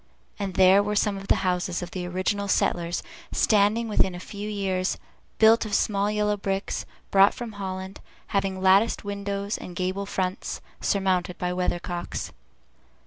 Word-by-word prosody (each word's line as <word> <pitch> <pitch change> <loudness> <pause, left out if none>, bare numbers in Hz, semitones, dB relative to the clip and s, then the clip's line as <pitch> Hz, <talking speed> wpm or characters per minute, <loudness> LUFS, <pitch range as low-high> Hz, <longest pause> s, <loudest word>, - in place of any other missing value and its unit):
and 195 -3 -3
there 190 +1 +6
were 210 +1 -1
some 205 0 +2
of 195 0 -8
the - - +4
houses 180 -1 0
of 175 - -7
the 180 -1 -4
original 185 +3 -1
settlers 175 -3 0 0.3
standing 215 +2 +3
within 190 -4 +1
a - - -6
few 205 +3 -6
years, 190 -3 -1 0.4
built 225 +1 +6
of 210 -2 -2
small 200 0 +1
yellow 210 0 +1
bricks, 195 -1 -3 0.2
brought 195 +1 +6
from 240 -2 -6
Holland, 190 -1 -6 0.3
having 195 -1 -1
latticed 195 +4 +4
windows 200 0 -3
and 180 - -9
gable 185 +2 -2
fronts, 185 -1 -2 0.2
surmounted 185 -2 0
with 180 0 -1
weathercocks. 175 -1 -3
195 Hz, 150 wpm, -26 LUFS, 185-205 Hz, 0.4 s, there